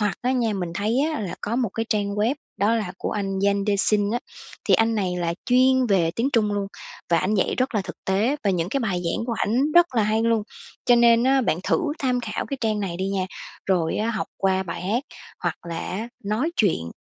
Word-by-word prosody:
Hoặc 205 Hz, -2 st, 0 dB
á 255 Hz, +1 st, +1 dB
nha, 235 Hz, -4 st, +1 dB
mình 180 Hz, -4 st, -3 dB
thấy 215 Hz, +5 st, 0 dB, 0.2 s
á -, -, -3 dB
là 190 Hz, -4 st, -4 dB
có 225 Hz, +3 st, -2 dB
một 245 Hz, -4 st, +1 dB
cái 225 Hz, +3 st, -3 dB
trang 200 Hz, -2 st, 0 dB
web 220 Hz, +6 st, +1 dB, 0.2 s
đó 210 Hz, +4 st, +2 dB
là 205 Hz, -5 st, -2 dB
của -, -, -3 dB
anh 195 Hz, -2 st, -2 dB
Yangdexin 200 Hz, +1 st, +2 dB
á, 240 Hz, -, 0 dB, 0.5 s
thì -, -, +7 dB
anh 225 Hz, 0 st, +3 dB
này 185 Hz, -4 st, -1 dB
là 170 Hz, -1 st, -1 dB
chuyên 255 Hz, +1 st, +4 dB
về 180 Hz, -6 st, +3 dB
tiếng 240 Hz, +4 st, +1 dB
Trung 210 Hz, -3 st, +2 dB
luôn, 200 Hz, -1 st, -1 dB, 0.4 s
và 170 Hz, -, +4 dB
ảnh 190 Hz, +7 st, 0 dB
dạy 195 Hz, -, +1 dB
rất 255 Hz, -1 st, 0 dB
là 210 Hz, -, +2 dB
thực -, -, -8 dB
tế 215 Hz, +9 st, +2 dB
và 200 Hz, -, +3 dB
những 175 Hz, -2 st, 0 dB
cái 275 Hz, +5 st, -1 dB
bài 185 Hz, -6 st, -1 dB
giảng 170 Hz, +7 st, -1 dB
của 235 Hz, -, -1 dB
ảnh 260 Hz, +8 st, +1 dB
rất 345 Hz, -6 st, +5 dB
là 225 Hz, -, +3 dB
hay 215 Hz, +2 st, +1 dB
luôn. 230 Hz, -2 st, +2 dB, 0.4 s
Cho 245 Hz, -, +5 dB
nên 235 Hz, 0 st, +5 dB
á 270 Hz, 0 st, +4 dB
bạn 175 Hz, -7 st, 0 dB
thử -, -, +2 dB, 0.2 s
tham 250 Hz, -2 st, 0 dB
khảo -, -, -4 dB
cái 275 Hz, -, -3 dB
trang 215 Hz, -2 st, 0 dB
này 180 Hz, -4 st, -3 dB
đi 190 Hz, +1 st, -2 dB
nha, 190 Hz, -2 st, -1 dB, 0.4 s
rồi 175 Hz, -4 st, +1 dB
á, 225 Hz, +2 st, 0 dB
học 215 Hz, -3 st, -2 dB
qua 190 Hz, -1 st, +1 dB
bài 175 Hz, -1 st, -6 dB
hát 225 Hz, +8 st, 0 dB, 0.4 s
hoặc -, -, -1 dB
là 165 Hz, -, -3 dB
á 220 Hz, +5 st, -4 dB, 0.2 s
nói 220 Hz, +10 st, 0 dB
chuyện, 85 Hz, -, +1 dB
210 Hz, 240 wpm, -24 LUFS, 190-235 Hz, 0.5 s, thì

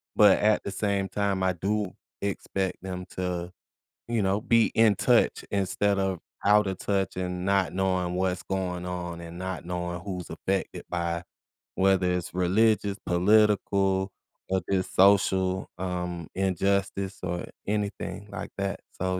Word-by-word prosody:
but 105 Hz, -2 st, +7 dB
at 105 Hz, 0 st, +3 dB
the 100 Hz, -, -4 dB
same 100 Hz, -1 st, 0 dB
time, 100 Hz, -2 st, 0 dB
I 95 Hz, 0 st, +2 dB
do 100 Hz, +3 st, -1 dB, 0.3 s
expect 95 Hz, -1 st, -2 dB
them 90 Hz, -1 st, -5 dB
to, 90 Hz, -1 st, -2 dB, 0.6 s
you 115 Hz, -2 st, 0 dB
know, 95 Hz, +2 st, +2 dB
be 115 Hz, 0 st, +4 dB
in 110 Hz, -2 st, +4 dB
touch, -, -, +3 dB
instead 100 Hz, 0 st, +1 dB
of 95 Hz, -2 st, 0 dB, 0.3 s
out 105 Hz, +1 st, +6 dB
of 95 Hz, -, -2 dB
touch 95 Hz, -2 st, -1 dB
and 90 Hz, -1 st, -3 dB
not 100 Hz, -2 st, +2 dB
knowing 95 Hz, -2 st, 0 dB
what's 90 Hz, 0 st, 0 dB
going 90 Hz, -2 st, -2 dB
on 90 Hz, -1 st, -4 dB
and 85 Hz, 0 st, -9 dB
not 95 Hz, -2 st, -4 dB
knowing 90 Hz, 0 st, -3 dB
who's 90 Hz, -2 st, -5 dB
affected 95 Hz, +4 st, -3 dB
by 85 Hz, -1 st, -2 dB, 0.5 s
whether 95 Hz, -1 st, +3 dB
it's 90 Hz, 0 st, -2 dB
religious, 100 Hz, +3 st, +2 dB
political, 95 Hz, 0 st, +3 dB, 0.4 s
or 95 Hz, -, +2 dB
the 95 Hz, -1 st, +2 dB
social, 95 Hz, -1 st, +3 dB
um, 90 Hz, -2 st, -3 dB
injustice 95 Hz, +1 st, 0 dB
or 90 Hz, -1 st, -2 dB, 0.2 s
anything 105 Hz, 0 st, -3 dB
like -, -, -5 dB
that. 100 Hz, 0 st, -2 dB, 0.2 s
So, 95 Hz, 0 st, 0 dB
95 Hz, 145 wpm, -27 LUFS, 90-100 Hz, 0.6 s, but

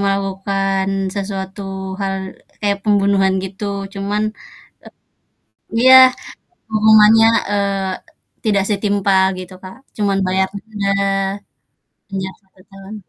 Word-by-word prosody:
melakukan 195 Hz, 0 st, -1 dB, 0.3 s
sesuatu 195 Hz, 0 st, -5 dB, 0.4 s
hal 195 Hz, -1 st, -1 dB, 0.5 s
kayak 200 Hz, -1 st, 0 dB
pembunuhan, 200 Hz, -2 st, +2 dB
gitu. 190 Hz, +2 st, -7 dB, 0.3 s
Cuman, 200 Hz, +2 st, -2 dB, 1.5 s
e -, -, -14 dB
iya, 260 Hz, +2 st, +7 dB, 0.8 s
hukumannya, 220 Hz, +1 st, +6 dB, 0.2 s
eee, 195 Hz, -2 st, -4 dB
tidak 205 Hz, -3 st, +2 dB
setimpal 200 Hz, -2 st, +1 dB
gitu, 185 Hz, 0 st, -9 dB
Kak. 185 Hz, +3 st, -10 dB, 0.2 s
Cuman 200 Hz, -2 st, 0 dB
bayar 190 Hz, +1 st, +1 dB
denda, 205 Hz, -1 st, -4 dB, 1.2 s
penjara 190 Hz, -1 st, -5 dB
1 190 Hz, -1 st, -27 dB
tahun. 195 Hz, +2 st, -11 dB
195 Hz, 95 wpm, -18 LUFS, 190-205 Hz, 1.5 s, iya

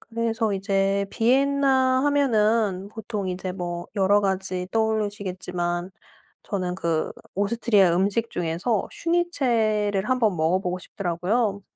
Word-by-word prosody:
그래서 225 Hz, -1 st, -1 dB
이제 195 Hz, 0 st, 0 dB
비엔나 265 Hz, +1 st, +3 dB
하면은 220 Hz, -8 st, +2 dB
보통 210 Hz, -2 st, -5 dB
이제 185 Hz, 0 st, -4 dB
뭐 175 Hz, -2 st, -5 dB
여러 200 Hz, +1 st, +4 dB
가지 190 Hz, -2 st, -1 dB
떠오르시겠지만 190 Hz, -5 st, -2 dB, 0.5 s
저는 185 Hz, -3 st, -2 dB
그 165 Hz, -3 st, -1 dB, 0.2 s
오스트리아 205 Hz, -3 st, +3 dB
음식 205 Hz, +5 st, 0 dB
중에서 175 Hz, +6 st, -1 dB
슈니첼을 230 Hz, -, 0 dB
1 255 Hz, 0 st, +2 dB
번 215 Hz, -6 st, +2 dB
먹어보고 180 Hz, +3 st, 0 dB
싶더라고요. 200 Hz, +4 st, -1 dB
205 Hz, 275 characters per minute, -24 LUFS, 185-230 Hz, 0.5 s, 여러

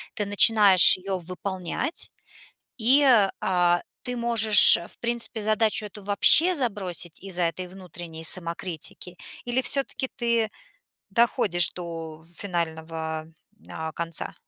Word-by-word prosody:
ты 210 Hz, -, -4 dB
начинаешь 205 Hz, -3 st, +7 dB
ее 190 Hz, +1 st, -6 dB
выполнять- 185 Hz, -, -7 dB, 0.7 s
и, 265 Hz, +5 st, +4 dB, 0.4 s
а, 175 Hz, -1 st, 0 dB, 0.2 s
ты 250 Hz, -1 st, -6 dB
можешь, 230 Hz, -3 st, +5 dB
в -, -, -14 dB
принципе, 235 Hz, -1 st, -3 dB
задачу 215 Hz, 0 st, -1 dB
эту 210 Hz, 0 st, -12 dB
вообще 300 Hz, -, +3 dB
забросить 195 Hz, -, -4 dB
из-за 185 Hz, -2 st, -3 dB
этой 175 Hz, +2 st, -3 dB
внутренней 175 Hz, -3 st, -11 dB
самокритики, 175 Hz, +1 st, -1 dB, 0.3 s
или 245 Hz, +2 st, -1 dB
всё-таки 265 Hz, 0 st, -2 dB
ты 235 Hz, -3 st, -1 dB, 0.6 s
доходишь 210 Hz, -7 st, +1 dB
до 165 Hz, -2 st, -10 dB, 0.2 s
финального, 160 Hz, -3 st, -6 dB, 0.4 s
а, 160 Hz, 0 st, -8 dB
конца? 170 Hz, -1 st, -4 dB
190 Hz, 110 wpm, -23 LUFS, 170-225 Hz, 0.7 s, начинаешь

